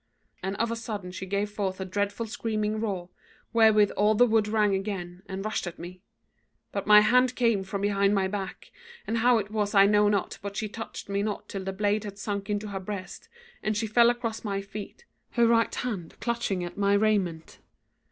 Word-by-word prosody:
And 190 +2 -3
of 230 +2 0
a - - -1
sudden 210 -5 -5
she 190 +1 -6
gave 200 +2 -1
forth 195 -2 -3
a 190 - -3
dreadful 200 +4 -2
screaming 215 -1 -2
roar, 190 -5 -3 0.4
wherewith 220 -3 +5
all 210 +2 +3
the 245 - +6
wood 220 -2 +2
rang 210 -2 +2
again, 190 -2 -4
and 195 +1 -5
rushed 215 -4 -2
at 175 - -6
me; 180 +1 -9 0.7
but 200 -1 -4
my 210 0 +9
hand 250 +3 +4
came 230 -5 +2
from 195 +1 -4
behind 200 0 +2
my 190 -1 +2
back, 195 -1 -6 0.3
and 230 +1 -1
how 245 +1 +5
it 210 -1 -3
was 210 -1 -1
I 195 0 +8
know 210 0 +4
not, 200 -2 -1
but 200 0 -6
she 215 - -1
touched 225 +2 -7
me 200 0 -1
not 210 0 -3
till 195 -1 -5
the 195 - -3
blade 205 +2 0
had 200 -1 -7
sunk 205 -1 -4
into 210 0 -2
her 195 -1 -4
breast, 190 -1 -7 0.3
and 215 -1 -1
she 220 - 0
fell 235 +2 +5
across 235 -2 -2
my 200 -2 -2
feet, 200 - -8 0.3
her 235 -1 +4
right 230 0 +3
hand 205 -10 -4
clutching 210 -6 -1
my 200 0 +2
raiment. 200 -6 0
205 Hz, 200 wpm, -27 LUFS, 195-220 Hz, 0.7 s, my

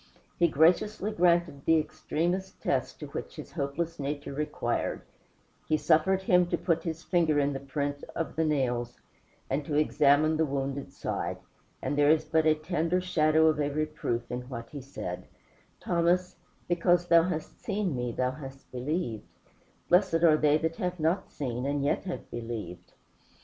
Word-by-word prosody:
He 170 - +5
graciously 180 +7 +2
granted 170 -6 +2
the 165 - +5
extremest 170 +4 -2
test - - -1
which - - -6
his - - -9
hopeless 160 +3 -3
nature 145 0 -4
required 150 +2 -2 0.6
he 155 - +2
suffered 190 +6 +3
him 180 -2 +4
to 175 - 0
put 165 -1 0
his 165 0 -5
finger 165 -4 +2
in 145 0 +2
the 135 - -4
print 140 +1 -3
of 165 - -3
the 160 - +1
nails 125 -6 -1 0.5
and 140 +3 -1
to 145 +1 -3
examine 150 +1 +4
the 160 - +3
wounded 140 0 -3
side; - - -3 0.5
and - - -1
there 145 0 +4
is 155 0 +4
but 160 0 +2
a 155 - +5
tender 165 +2 0
shadow 160 -3 +3
of 155 -1 +3
a 145 -1 +1
reproof 145 -5 -2
in 125 0 -3
what 115 -3 -7
he 145 - -6
said 90 -9 -6 0.5
"Thomas, 175 +1 +1 0.3
because 175 0 +3
thou 170 -1 +6
hast 165 -2 -4
seen 200 - -1
me, 125 -1 -2
thou 125 +2 0
hast 135 -1 -10
believed; 125 - -3 0.6
blessed 175 -2 +3
are 160 -2 +7
they 150 0 +4
that 160 +1 -2
have 180 -4 -2
not 165 +4 0
seen 125 -3 -4
and 140 0 0
yet 145 - 0
have 180 - -5
believed." 110 -7 -6
155 Hz, 165 wpm, -29 LUFS, 140-170 Hz, 0.6 s, are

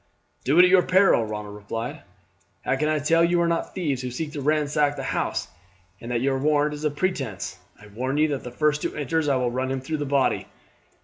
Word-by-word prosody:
"Do 140 +5 +2
it 180 - +9
at 180 - +6
your 185 -1 +7
peril," 185 - +4
Ronald 105 -1 -6
replied. 115 +3 -5 0.6
"How - - +2
can 150 +3 0
I 155 - +2
tell 165 +3 +3
you 175 +1 +3
are 170 - +2
not 170 0 -2
thieves 145 -9 -1
who 125 - -4
seek 150 +5 -4
to 145 - -5
ransack 150 0 +1
the 135 - -5
house, - - -2 0.5
and 115 - -8
that 120 -1 0
your 135 0 +1
warrant 150 +1 +2
is 150 +1 -7
a 150 - +2
pretence? 135 - -3 0.2
I 105 - -14
warn 125 +7 -3
you 155 +1 +4
that 140 -2 -3
the 125 - -6
first 150 +4 0
who - - -3
enters 150 +2 -1
I 140 - +3
will 125 -2 0
run 130 +1 -2
him 135 0 -1
through 155 +4 -3
the 145 - -3
body." 140 -1 +1
145 Hz, 235 wpm, -24 LUFS, 125-155 Hz, 0.6 s, it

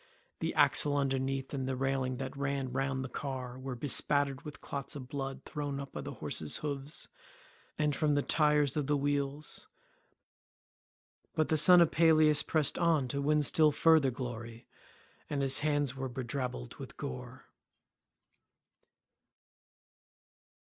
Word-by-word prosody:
The - - -1
axle 145 -1 +4
underneath 135 0 -1
and 135 -2 -2
the 130 - -1
railing 130 -1 -1
that 130 +1 -5
ran 140 -2 -2
round 135 0 -1
the - - -4
car 130 -1 -5
were 130 -1 -5
bespattered 140 +1 +1
with 150 -2 -9
clots 140 0 -5
of 130 -3 -7
blood 135 -1 -5
thrown 145 -2 -4
up 140 -1 -7
by - - -6
the - - -7
horses' 75 -2 -3
hoofs, 140 0 -3 0.7
and 150 -2 +1
from 150 -1 +1
the 145 - +1
tyres 150 -3 +2
of 150 -3 -1
the 145 0 +2
wheels; 145 +1 -2 1.7
but 155 - +1
the 160 - +3
son 175 +3 +8
of 170 - +4
Peleus 155 -2 +5
pressed 155 -3 0
on 160 -6 +2
to 140 +3 -2
win 150 +1 +2
still 155 +1 +5
further 160 -2 +4
glory, 120 -2 -7 0.6
and 140 -2 -1
his 135 +1 +4
hands 145 -3 0
were 130 -1 -4
bedrabbled 125 - -5
with - - -9
gore. 125 - -7
140 Hz, 140 wpm, -32 LUFS, 130-150 Hz, 1.7 s, son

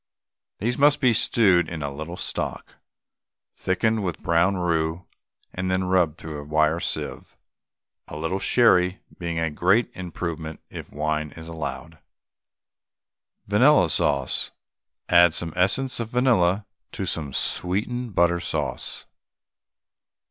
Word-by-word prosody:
These 120 +5 -2
must 145 +1 +5
be 125 -3 +4
stewed 95 -7 +3
in 80 -3 -5
a 70 -1 -4
little 80 +5 -7
stock, - - -4 0.8
thickened 110 +3 0
with 90 -5 -2
brown 85 +4 +2
roux, 85 -1 -1 0.5
and 95 0 -3
then 95 0 +1
rubbed 90 -4 +1
through 80 -2 -7
a - - -9
wire 80 +2 +1
sieve, - - -4 0.7
a 75 - -8
little 80 +5 -2
sherry 95 -6 +3 0.2
being 85 -2 -3
a 80 -1 0
great 95 +9 +2
improvement 85 -3 -5
if - - -9
wine 75 0 -2
is 80 -1 -10
allowed. 80 0 -6 1.5
VANILLA 105 - +4
SAUCE. 70 -2 +1 0.6
Add 85 -1 +5
some 85 -2 -4
essence 100 +10 +1
of 115 -2 -3
vanilla 110 -6 +2 0.3
to 95 - -3
some 75 -5 -3
sweetened 100 - -2
butter 85 0 +3
sauce. - - -3
85 Hz, 125 wpm, -24 LUFS, 80-100 Hz, 1.5 s, must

